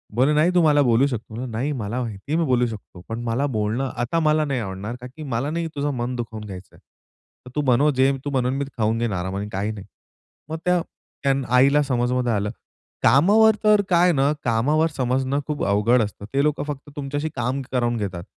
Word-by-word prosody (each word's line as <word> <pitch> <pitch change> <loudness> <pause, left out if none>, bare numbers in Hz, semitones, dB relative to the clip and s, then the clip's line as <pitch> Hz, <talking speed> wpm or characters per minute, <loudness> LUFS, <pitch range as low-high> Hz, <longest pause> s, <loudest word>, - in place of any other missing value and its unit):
बोलली," 130 +5 +3
नाही 155 +4 +4
तू 175 - +5
मला 150 -2 +5
बोलू 120 +1 +4
शकतो." 120 -1 -5
नाही 125 +4 -2
मला 120 -2 -3
माहिती 110 +1 -6
आहे, 160 - +2
"मी 165 - +2
बोलू 125 -3 +2
शकतो. 105 -5 -9
पण 115 +1 -3
मला 120 +4 0
बोलणं 110 +4 -1
आता 120 +8 0
मला 155 -1 +2
नाही 135 -3 -1
आवडणार 100 +3 -5
कारण 125 0 -9
की 155 - -7
मला 125 +4 -1
नाही 165 0 -2
तुझं 145 0 -1
मन 120 +1 -3
दुखवून 110 -3 -5
घ्यायचंय. 95 -2 -10
तर 125 - -22
तू 150 - +1
बनव 130 +4 +4
जे 130 +1 +4
तू - - -1
बनवून 130 -1 0
मी 140 - -1
खाऊन 110 0 +1
घेईन 115 -3 -1
आरामाने, 95 +2 -3
काही 105 +2 -2
नाही." 105 -3 -8 0.6
मग 160 - -3
त्या 180 -1 +3 0.7
आईला 140 +3 +5
समजमध्ये 125 -2 0
आलं. 105 0 -1 0.5
कामावर 210 +10 +5
तर 210 -1 +5
काय 175 0 +5
ना, 140 0 +2
कामावर 135 +8 +2
समजणं 130 +2 0
खूप 150 -2 -2
अवघड 105 +5 +3
असतं. 105 -1 -7
ते 140 +1 +2
लोकं 150 0 0
फक्त 145 0 -6
तुमच्याशी 145 +1 -3
काम 125 +2 -1
करून 120 -2 0
घेतात. 95 -5 -4
125 Hz, 200 wpm, -23 LUFS, 115-145 Hz, 0.7 s, तू